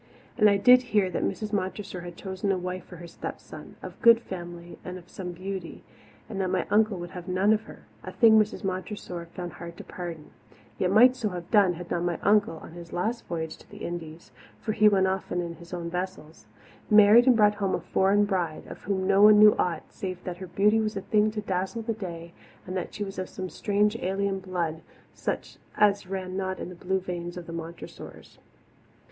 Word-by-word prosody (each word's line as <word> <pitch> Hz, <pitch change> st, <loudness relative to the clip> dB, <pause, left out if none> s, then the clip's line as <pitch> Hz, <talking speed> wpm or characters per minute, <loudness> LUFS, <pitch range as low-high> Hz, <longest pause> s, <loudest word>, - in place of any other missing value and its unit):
And 210 Hz, -3 st, +5 dB
I 200 Hz, -, +4 dB
did 250 Hz, +5 st, +7 dB, 0.2 s
hear 190 Hz, -3 st, +3 dB
that -, -, -2 dB
Mrs. 210 Hz, +2 st, -3 dB
Montressor 190 Hz, -1 st, -3 dB
had 175 Hz, -1 st, -9 dB
chosen 190 Hz, 0 st, -2 dB
a 190 Hz, -, +1 dB
wife 180 Hz, 0 st, -5 dB
for 180 Hz, -, -12 dB
her 175 Hz, 0 st, -10 dB
stepson, -, -, -9 dB
of -, -, -9 dB
good 230 Hz, -1 st, +8 dB
family 175 Hz, -5 st, -8 dB
and 180 Hz, -1 st, -7 dB
some 180 Hz, -2 st, -7 dB
beauty, 185 Hz, 0 st, -6 dB, 0.4 s
but 200 Hz, -, -5 dB
that 190 Hz, -1 st, 0 dB
my -, -, 0 dB
Uncle 215 Hz, -1 st, +3 dB
Hugh -, -, -7 dB
would 175 Hz, -, -6 dB
have 180 Hz, -1 st, -8 dB
none 190 Hz, +3 st, +3 dB
of 220 Hz, 0 st, -1 dB
her -, -, -13 dB, 0.2 s
a -, -, -6 dB
thing 220 Hz, -2 st, +6 dB
Mrs. 215 Hz, +1 st, 0 dB
Montressor 185 Hz, -2 st, -4 dB
found 175 Hz, -1 st, -5 dB
hard 170 Hz, 0 st, -9 dB
to -, -, -8 dB
pardon, 170 Hz, -4 st, -7 dB, 0.5 s
yet 180 Hz, -, +2 dB
might 245 Hz, +6 st, +6 dB
so 230 Hz, -5 st, -2 dB
have 175 Hz, -2 st, -7 dB
done 200 Hz, -5 st, +5 dB
had 175 Hz, +1 st, -9 dB
not 170 Hz, -, 0 dB
my 175 Hz, -1 st, -1 dB
uncle, 205 Hz, -4 st, +3 dB
on -, -, -10 dB
his 170 Hz, 0 st, -11 dB
last 225 Hz, +7 st, -2 dB
voyage 160 Hz, -2 st, -4 dB
to -, -, -19 dB
the -, -, -8 dB
Indies 170 Hz, -1 st, -7 dB, 0.3 s
for 215 Hz, -, -2 dB
he 215 Hz, 0 st, +5 dB
went 195 Hz, -2 st, +3 dB
often 190 Hz, -1 st, -1 dB
in 170 Hz, -1 st, -4 dB
his 170 Hz, +1 st, -14 dB
own 175 Hz, -2 st, -4 dB
vessels 180 Hz, -3 st, -6 dB, 0.4 s
married 215 Hz, +3 st, +7 dB
and 255 Hz, -, +7 dB
brought 210 Hz, -1 st, +5 dB
home 200 Hz, -2 st, -1 dB
a -, -, -2 dB
foreign 200 Hz, +2 st, +2 dB
bride, 180 Hz, -6 st, -2 dB
of -, -, -10 dB
whom 190 Hz, -1 st, -1 dB
no 195 Hz, +1 st, +4 dB
one 210 Hz, 0 st, +9 dB
knew 210 Hz, 0 st, +8 dB
aught 170 Hz, -3 st, 0 dB
save 185 Hz, -2 st, -5 dB
that 180 Hz, -1 st, -5 dB
her 185 Hz, 0 st, -8 dB
beauty 210 Hz, +5 st, +3 dB
was 215 Hz, -2 st, -1 dB
a -, -, -2 dB
thing 210 Hz, +2 st, +2 dB
to 215 Hz, 0 st, -4 dB
dazzle 190 Hz, +3 st, -2 dB
the 225 Hz, 0 st, -1 dB
day 170 Hz, -5 st, -7 dB, 0.3 s
and 185 Hz, -, -5 dB
that 185 Hz, -, -3 dB
she 210 Hz, -, -4 dB
was 195 Hz, -1 st, -6 dB
of 185 Hz, -, -4 dB
some 185 Hz, -1 st, -6 dB
strange 210 Hz, +1 st, +1 dB
alien 195 Hz, 0 st, -1 dB
blood 175 Hz, -4 st, -3 dB, 0.3 s
such -, -, -4 dB, 0.2 s
as 200 Hz, -2 st, +3 dB
ran 185 Hz, -1 st, -4 dB
not 190 Hz, -1 st, -2 dB
in -, -, -6 dB
the -, -, -8 dB
blue 190 Hz, +2 st, -1 dB
veins 175 Hz, -1 st, -5 dB
of 175 Hz, -, -7 dB
the 165 Hz, -, -8 dB
Montressors. 165 Hz, 0 st, -9 dB
190 Hz, 220 wpm, -27 LUFS, 175-210 Hz, 0.5 s, one